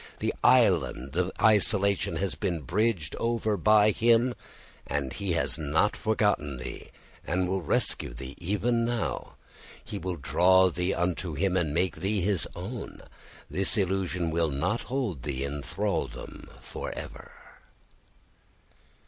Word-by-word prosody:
This - - -1
island 65 +4 +3
of 90 +1 +1
isolation 100 -4 +3
has 95 +3 -1
been 85 -4 -2
bridged 90 - 0
over 115 -2 0
by 105 +2 +5
him, 115 +3 +3 0.5
and 70 -2 -2
he 100 -4 -2
has 70 -1 0
not 80 +7 +1
forgotten 105 - 0
thee, 60 - -7 0.3
and 90 +2 0
will 95 +1 -1
rescue 80 - 0
thee 65 +3 -8
even 105 +6 0
now. 120 -1 -2 0.5
He - - -5
will 90 0 -3
draw 95 +4 +4
thee 90 +2 -1
unto 90 -1 -1
him 95 +4 +1
and 85 -5 +1
make 85 +3 0
thee 100 +4 0
his 95 -3 0
own. 105 +8 -7 0.4
This 95 +4 0
illusion 95 -3 0
will 80 0 +1
not 85 +11 -1
hold 120 - -2
thee 70 0 -3
in 70 +1 -4
thraldom - - -4
for - - -6
ever." - - -8
90 Hz, 135 wpm, -28 LUFS, 80-105 Hz, 0.5 s, by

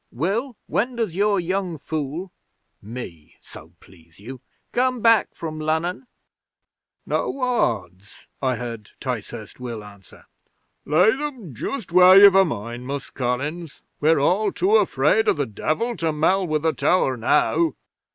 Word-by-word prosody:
Will, 205 - -2
when 245 +4 -1
does 220 -8 -2
your 200 0 +2
young 180 -1 -2
fool" 155 +5 -5 0.5
(me, 100 -8 -9
so 80 +3 -14
please 85 -2 -20
you!) 125 +5 -10 0.3
"come 255 0 +1
back 230 0 +3
from 155 -2 -6
Lunnon?" 160 +8 -2 1.0
'"No 275 - -2
odds," 100 - -2 0.2
I 130 -2 +1
heard 115 -3 -7
Ticehurst - - -6
Will 120 -4 -6
answer. 100 -3 -16 0.6
"Lay 175 +9 +4
'em 260 - -5
just 205 - -5
where 180 +1 +8
you've 200 -1 +9
a 195 0 +6
mind, 120 - -5
Mus' 140 0 -5
Collins. 140 +6 -4 0.2
We're 160 +2 +3
all 195 +8 +2
too 400 +4 +2
afraid 435 -2 +2
o' 415 - +5
the - - -2
Devil 155 - -2
to 165 -1 0
mell 180 +5 +1
with 155 -1 -1
the 160 -1 +2
tower 135 -8 +1
now." 150 - +1
160 Hz, 140 wpm, -22 LUFS, 125-205 Hz, 1.0 s, you've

